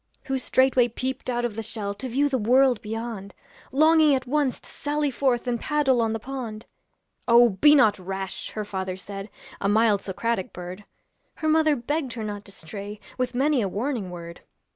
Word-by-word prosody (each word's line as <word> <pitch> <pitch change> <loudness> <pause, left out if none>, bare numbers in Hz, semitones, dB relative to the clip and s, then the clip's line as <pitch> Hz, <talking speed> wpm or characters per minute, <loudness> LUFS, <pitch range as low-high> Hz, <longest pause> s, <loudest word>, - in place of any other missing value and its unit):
Who 270 -2 -2
straightway 260 -1 +3
peeped 255 +3 -4
out 240 -1 0
of 230 -3 -3
the 225 - -3
shell 215 -2 -3
To 235 +6 -6
view 280 +5 +2
the 265 -2 0
world 250 +2 +4
beyond, 220 -2 -6 0.4
Longing 310 +1 +5
at 260 - -3
once 280 0 0
to - - -14
sally 295 0 -2
forth 255 -2 0
And 240 -1 -1
paddle 270 -4 +2
on 225 -1 +1
the 225 - -2
pond. 235 -3 -6 0.6
'Oh! 240 0 +7
be 260 +10 +5
not 215 -8 +4
rash,' 190 +1 -5
her 215 -1 -3
father 190 -2 -4
said, 195 +2 -8 0.3
A 200 - 0
mild 215 -1 +3
Socratic 200 0 -2
bird; 180 +3 -8 0.5
Her 315 - -3
mother 310 -1 +4
begged 275 +1 -2
her 225 - -5
not 205 -1 -5
to 200 - -13
stray 200 +4 -8 0.2
With 250 -1 -1
many 275 0 +2
a 200 - -1
warning 220 -1 -2
word. 170 -1 -9
235 Hz, 185 wpm, -25 LUFS, 205-265 Hz, 0.6 s, Oh